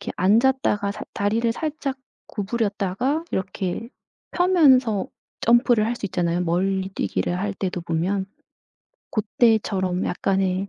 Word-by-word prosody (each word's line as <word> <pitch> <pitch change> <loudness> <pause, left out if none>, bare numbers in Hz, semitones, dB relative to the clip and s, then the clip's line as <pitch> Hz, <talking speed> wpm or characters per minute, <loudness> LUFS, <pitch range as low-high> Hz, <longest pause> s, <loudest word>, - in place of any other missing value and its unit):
이렇게 - - -5
앉았다가 210 0 +2
살 210 - -8
다리를 225 +3 0
살짝 300 -1 -3 0.3
구부렸다가 220 - -1
이렇게 190 +3 -3 0.4
펴면서 270 - +4 0.3
점프를 235 -2 +4
할 235 - -1
수 210 - -4
있잖아요. 175 -2 -1
멀리뛰기를 190 0 -1
할 205 +2 -2
때도 185 -2 -3
보면 175 +4 -1 0.8
고 215 - 0 0.2
때처럼 195 -6 +2
약간의 190 +1 0
205 Hz, 280 characters per minute, -23 LUFS, 190-235 Hz, 0.8 s, 펴면서